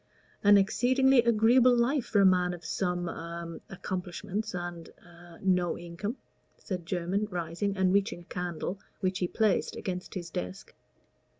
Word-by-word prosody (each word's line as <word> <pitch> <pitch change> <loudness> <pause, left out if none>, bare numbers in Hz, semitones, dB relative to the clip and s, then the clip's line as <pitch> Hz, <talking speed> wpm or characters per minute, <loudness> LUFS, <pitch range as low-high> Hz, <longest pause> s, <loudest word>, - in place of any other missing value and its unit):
"An 205 0 +8
exceedingly 255 +6 +4
agreeable 235 +2 +5
life 245 +2 +2
for 205 - +3
a - - +6
man 180 -1 +3
of 170 -1 -14
some 180 -2 -1
a 170 0 -6
accomplishments 190 +2 -4
and 175 -1 -5
a 175 -1 -16
no 180 -2 +2
income," 175 +8 -5 0.4
said 180 -4 -5
Jermyn, 185 +4 -1
rising, 180 +3 -2
and 190 -1 +3
reaching 200 -2 +1
a - - -16
candle, 180 +2 -4 0.2
which 185 -1 0
he 180 - +1
placed 215 0 +1
against 180 -1 -5
his 175 -3 -5
desk. 90 +1 -6
185 Hz, 145 wpm, -29 LUFS, 175-205 Hz, 0.4 s, An